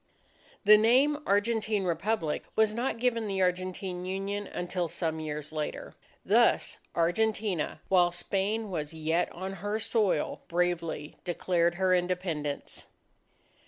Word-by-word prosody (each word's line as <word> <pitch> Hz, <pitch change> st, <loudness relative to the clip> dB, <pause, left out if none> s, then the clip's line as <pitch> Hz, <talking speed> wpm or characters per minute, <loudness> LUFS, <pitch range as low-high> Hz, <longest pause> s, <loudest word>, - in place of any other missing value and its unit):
The 210 Hz, +1 st, +9 dB
name 265 Hz, +7 st, +4 dB
"Argentine 210 Hz, 0 st, +1 dB
Republic" 175 Hz, -2 st, -1 dB
was 220 Hz, -1 st, +3 dB
not 240 Hz, +2 st, -1 dB
given 230 Hz, -2 st, 0 dB
the 195 Hz, -1 st, 0 dB
Argentine 180 Hz, 0 st, -2 dB
Union 195 Hz, +2 st, -3 dB
until 175 Hz, 0 st, -2 dB
some 160 Hz, -1 st, -2 dB
years 150 Hz, -1 st, -5 dB
later. 155 Hz, -1 st, -4 dB, 0.3 s
Thus, -, -, +3 dB, 0.2 s
Argentina, 190 Hz, +1 st, 0 dB
while 180 Hz, -2 st, +4 dB
Spain 200 Hz, +4 st, -1 dB
was 155 Hz, -2 st, -4 dB
yet 160 Hz, +2 st, 0 dB
on 190 Hz, +2 st, -5 dB
her 205 Hz, +1 st, -1 dB
soil, 215 Hz, -7 st, 0 dB
bravely 170 Hz, -3 st, -1 dB
declared 175 Hz, -1 st, +1 dB
her 185 Hz, 0 st, +2 dB
Independence. 175 Hz, -5 st, -2 dB
185 Hz, 120 wpm, -29 LUFS, 170-210 Hz, 0.3 s, The